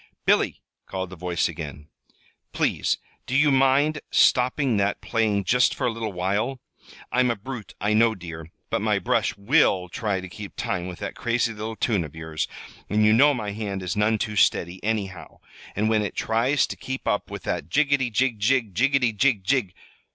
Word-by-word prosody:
"Billy!" - - +2 0.2
called 95 -1 -4
the - - -8
voice 90 -1 -1
again. 75 -2 -7 0.7
"Please, - - +1 0.3
do 125 - -2
you 145 +1 +5
mind 135 +3 +3
stopping 125 -1 +3
that 100 0 0
playing 110 -4 0
just 125 +7 +3
for - - -2
a 125 - +2
little 110 -1 -4
while? 100 +8 -1 0.5
I'm 125 +1 +3
a 120 - +1
brute, 115 0 -8
I 105 +1 +1
know, 110 +1 +4
dear, 85 -3 -9 0.2
but - - 0
my - - +2
brush - - 0
will 95 -2 +3
try 100 0 -2
to 95 - -7
keep 100 +2 -9
time 90 -1 -2
with 90 -1 -7
that 100 - -4
crazy 120 -1 0
little 110 +1 -5
tune 105 -6 0
of 75 -1 -10
yours, 80 -1 -3 0.4
and 105 +1 +3
you 105 - +5
know 140 +5 +5
my 105 -4 -3
hand 100 -2 -4
is 90 -3 -2
none 105 +1 +2
too 105 0 -3
steady, 90 -2 +2
anyhow, 100 -4 -3 0.4
and 105 +2 +1
when 110 -1 +2
it 105 - -4
tries 120 +5 +2
to - - -6
keep 130 0 -6
up 105 - 0
with - - -7
that - - -3
jiggety, 140 -3 +2
jig, 120 -1 +1
jig, 115 -1 +1
jiggety, 125 +1 +2
jig, 110 -3 +2
jig 120 -4 +1
110 Hz, 190 wpm, -24 LUFS, 95-125 Hz, 0.7 s, you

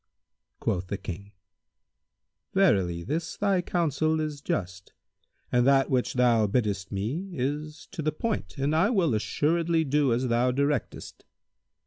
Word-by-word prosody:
Quoth 90 0 -1
the 100 - -3
King, 95 +1 -7 1.2
"Verily, 95 - +3
this 165 - -3
thy 195 -3 +2
counsel 160 -2 0
is 150 -2 -3
just 90 -7 -4 0.6
and 125 +1 +3
that 135 0 +4
which 130 +2 0
thou 120 -4 +4
biddest 100 -3 -1
me 125 - -3
is 150 +3 -4
to 185 - -5
the 155 0 0
point 155 - -3
and 140 +3 0
I 180 +6 +3
will 185 - +2
assuredly 165 +8 +1
do 145 -2 +2
as 125 +2 +1
thou 120 +1 +2
directest." 140 +3 -2
140 Hz, 135 wpm, -27 LUFS, 110-160 Hz, 1.2 s, that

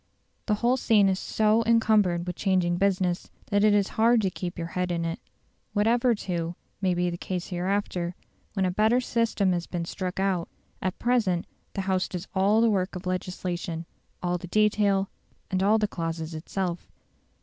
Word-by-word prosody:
The 210 - +3
whole 240 +4 +2
scene 210 -5 +4
is 190 0 0
so 215 +1 +2
encumbered 210 -7 +3
with 180 - -4
changing 180 -3 +1
business, 185 -2 +1 0.2
that 205 0 +3
it 215 - +6
is 200 -1 +2
hard 230 +1 +5
to 190 - +1
keep 175 -1 -5
your 170 -1 -4
head 180 +1 -1
in 170 -1 -1
it. 165 0 -3 0.5
Whatever, 235 +3 +3
too, 175 -4 -3 0.3
may 185 -2 +2
be 175 0 +1
the 170 - -6
case 180 -2 -4
hereafter, 180 -1 -1 0.4
when 195 -2 +1
a 180 - +1
better 220 +6 +3
system 230 -5 +1
has 175 -1 -2
been 170 -2 -3
struck 185 +1 -4
out, 190 -3 0 0.3
at 185 -1 -2
present 220 -8 +1 0.3
the 195 - 0
House 190 -1 0
does 180 +1 -6
all 200 +3 +3
the 230 - +5
work 190 -1 0
of 180 +1 -7
legislation, 180 -2 -3 0.4
all 175 0 0
the 180 - -8
detail, 200 -1 +2 0.4
and 185 0 +1
all 205 +3 +4
the 215 -1 +1
clauses 165 -2 -4
itself. 175 +2 -4
190 Hz, 180 wpm, -27 LUFS, 175-210 Hz, 0.5 s, it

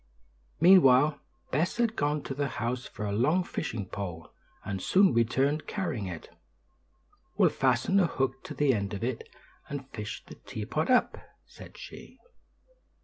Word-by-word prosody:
Meanwhile 150 -5 +6 0.3
Bess 160 +7 0
had 230 -2 +1
gone 145 -3 0
to - - -5
the 140 +1 -1
house 125 0 -3
for 105 - -6
a 100 - -2
long 145 - +2
fishing 115 - -4
pole, 90 -4 -7 0.3
and 100 -2 -4
soon 195 - +4
returned 135 +6 +1
carrying 160 - -3
it. 85 -3 -9 1.0
"We'll - - +5
fasten 130 +9 +2
a 180 - +4
hook 135 -3 -2
to - - -7
the 145 -3 +3
end 100 -2 -2
of 100 - -6
it, 125 -1 -3 0.4
and 140 -2 -5
fish 105 -1 -6
the - - -11
teapot 120 +10 -4
up," 250 -1 +3 0.3
said - - -14
she. - - -11
135 Hz, 150 wpm, -29 LUFS, 110-155 Hz, 1.0 s, Meanwhile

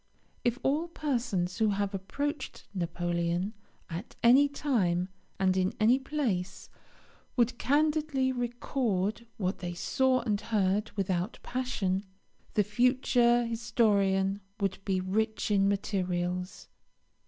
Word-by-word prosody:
If 240 0 +1
all 300 +5 +1
persons 235 - -1
who 220 -1 +4
have 200 0 -1
approached 285 - -4
Napoleon, 175 +1 -1 0.3
at 175 +7 -7
any 265 +5 +7
time 195 -12 0 0.3
and 190 -1 +3
in 185 0 +1
any 235 +5 +5
place, 255 -11 -2 0.6
would 240 -1 +2
candidly 295 -2 +2
record 235 -3 -1
what 185 -2 -1
they 175 -1 -4
saw 260 +7 +2
and 210 -3 -1
heard, 210 -2 +1
without 190 +1 -1
passion, 215 -7 -1 0.5
the 210 - +4
future 240 +2 +3
historian 205 -4 +1 0.2
would 195 -2 -1
be 190 -2 +1
rich 215 +4 -1
in 195 -1 +4
materials. 180 -2 -2
210 Hz, 110 wpm, -30 LUFS, 185-250 Hz, 0.6 s, any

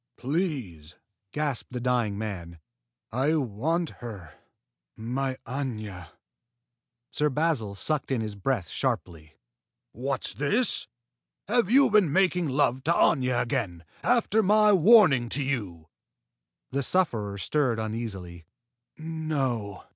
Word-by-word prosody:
"Please!" 125 - -3 0.4
gasped 150 -5 -3
the 125 - -3
dying 120 -5 0
man. 90 -6 -6 0.5
"I 135 +7 +1
want 155 - -1
her 100 -10 -8 0.6
my 130 +4 -2
Aña!" 110 - -5 1.0
Sir 150 0 +1
Basil 140 -8 -1
sucked 150 +8 -2
in 130 -3 0
his 110 -2 -3
breath 100 -2 -2
sharply. 80 0 -3 0.6
"What's 130 +3 -3
this? 210 - +2 0.6
Have 235 -6 +2
you 270 +1 +5
been 205 -8 +4
making 180 -1 +2
love 130 -1 +1
to 165 - +3
Aña 130 -7 +3
again, 90 -8 -3 0.2
after 230 -2 +2
my 210 +1 +5
warning 180 - +6
to 140 +4 0
you?" 100 -12 -3 0.8
The 140 +1 0
sufferer 115 - 0
stirred 130 +2 0
uneasily. 100 -7 -5 0.5
"No!" 140 - -3
130 Hz, 110 wpm, -27 LUFS, 105-155 Hz, 1.0 s, warning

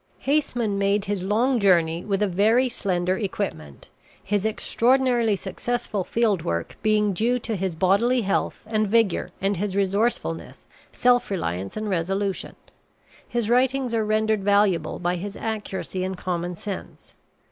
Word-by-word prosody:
Haseman 245 -8 0
made 200 +1 +1
his 200 -2 -2
long 230 +7 +1
journey 170 -4 +3
with 200 0 0
a - - +2
very 220 +7 +3
slender 185 -4 -1
equipment, 185 - -5 0.3
his 205 +1 0
extraordinarily 240 0 +2
successful 205 +1 -3
field 215 -3 +1
work 85 - -3
being 210 -1 +2
due 235 +6 +1
to 230 -2 -3
his 190 -3 -2
bodily 200 +9 +3
health 195 -2 -1
and 215 -1 0
vigor 210 -4 +2
and 195 0 0
his 195 +1 -2
resourcefulness, 200 -3 -1 0.3
self 245 0 +2
reliance, 95 - -3
and 215 0 -3
resolution. 195 +1 -2 0.7
His 235 -3 -1
writings 255 +1 +2
are 225 -1 +1
rendered 215 -1 +1
valuable 200 -5 +2
by 180 0 -1
his 200 +3 -6
accuracy 205 -4 -4
and 190 0 -3
common 175 -1 -3
sense. 195 +2 -8
205 Hz, 140 wpm, -24 LUFS, 185-225 Hz, 0.7 s, journey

